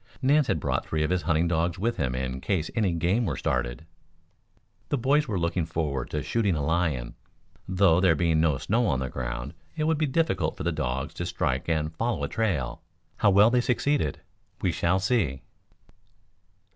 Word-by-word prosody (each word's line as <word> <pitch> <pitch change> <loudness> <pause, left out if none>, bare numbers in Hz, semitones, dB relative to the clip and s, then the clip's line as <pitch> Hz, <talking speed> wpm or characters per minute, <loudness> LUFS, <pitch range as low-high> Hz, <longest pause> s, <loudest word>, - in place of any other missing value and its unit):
Nance 145 +2 +3
had 80 - +1
brought - - -1
three 80 -1 0
of 75 - -1
his 90 -1 +1
hunting 80 0 +1
dogs 85 +1 0
with 115 +5 -1
him 65 -2 -1
in 65 0 -3
case 85 -6 -1
any 105 -6 +1
game 85 +8 +1
were 80 - -2
started. - - -2 1.0
The 145 - +1
boys 140 +4 +2
were 105 -4 -1
looking 85 0 0
forward 75 -6 -2
to 75 -2 -3
shooting 105 -6 +1
a 75 -2 -1
lion, 80 -7 0 0.5
though, 95 -2 +4
there 90 -3 +4
being 80 0 +2
no 80 -4 +2
snow 110 - +1
on 65 - +1
the 65 -1 -3
ground, - - -4 0.2
it 155 - -1
would 160 0 +1
be 155 - +2
difficult 165 +4 0
for - - -5
the - - +1
dogs 65 +3 -3
to 90 - -4
strike 75 -5 -1
and 80 -1 -1
follow 115 +6 -1
a - - 0
trail. 80 - -1 0.4
How 105 - +4
well 100 +4 +6
they 125 0 +3
succeeded 125 - 0 0.4
we 90 - +1
shall 85 +2 +1
see. 95 - 0
85 Hz, 190 wpm, -27 LUFS, 75-110 Hz, 1.0 s, well